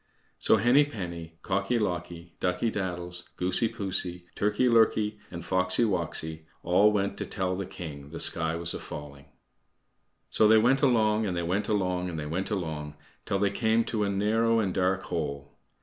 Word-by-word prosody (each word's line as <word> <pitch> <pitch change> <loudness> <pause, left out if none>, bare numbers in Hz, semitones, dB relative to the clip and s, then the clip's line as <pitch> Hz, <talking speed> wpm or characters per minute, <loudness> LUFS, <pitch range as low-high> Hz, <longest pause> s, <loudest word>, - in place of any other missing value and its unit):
So - - +4
Henny 120 +7 +5
penny, 85 - -7
Cocky 100 +5 0
locky, 85 -4 -3
Ducky 90 +5 0
daddles, 90 -3 -4
Goosey 95 +5 +1
poosey, 95 -5 -3
Turkey 105 +5 +1
lurkey, 110 -2 +3
and 85 -1 -8
Foxy 95 +4 +3
woxy 80 -6 -1 0.2
all 100 +5 +4
went 100 -1 -1
to - - -2
tell 95 -2 -1
the 95 0 -4
king 75 -6 -8
the 80 - -7
sky 80 -1 0
was 85 0 -2
a - - -5
falling. 70 -1 -9 1.1
So 110 - +4
they 110 +1 +7
went 125 +5 +4
along, 110 -5 +3
and 90 -2 -2
they 85 - -1
went 95 +5 -1
along, 90 -3 0
and 85 - -5
they 75 - -4
went 85 +6 -2
along 80 -7 -4 0.3
till 100 - +1
they 100 0 +1
came 110 +2 +2
to 110 -2 -1
a 100 - 0
narrow 110 +3 +2
and 100 -5 0
dark 95 0 +1
hole. 70 -4 -4
95 Hz, 175 wpm, -28 LUFS, 85-105 Hz, 1.1 s, they